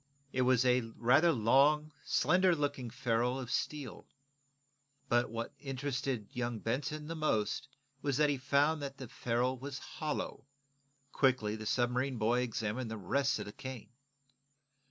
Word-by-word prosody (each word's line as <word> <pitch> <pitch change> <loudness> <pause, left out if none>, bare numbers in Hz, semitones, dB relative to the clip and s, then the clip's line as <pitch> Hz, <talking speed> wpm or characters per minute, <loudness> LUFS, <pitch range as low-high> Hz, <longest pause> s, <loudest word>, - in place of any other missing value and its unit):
It 130 - +1
was 130 0 +4
a 125 0 +4 0.2
rather 140 +8 +5
long, 145 +5 +4
slender 180 -1 +3
looking 145 -5 -2
ferrule 125 +1 0
of 125 -2 -6
steel. 145 -5 -3 1.0
But 120 -1 +3
what 115 +1 -4
interested 135 -4 -3
young 120 -1 -2
Benson 140 +7 -2
most 135 -5 0 0.3
was 140 -3 0
that 150 0 +4
he 145 - +1
had - - -14
found 145 +3 +3
that 140 -1 -5
the 130 -2 -7
ferrule 125 +3 -1
was 135 +1 -5
hollow. 150 -1 -4 0.6
Quickly 125 -6 +2
the 110 -1 -6
submarine 125 +2 +1
boy 115 +3 +2
examined 115 0 -2
the 110 - -4
rest 135 +7 +1
of 105 - -5
the 105 - -8
cane. 130 -4 -8
130 Hz, 145 wpm, -33 LUFS, 120-140 Hz, 1.0 s, rather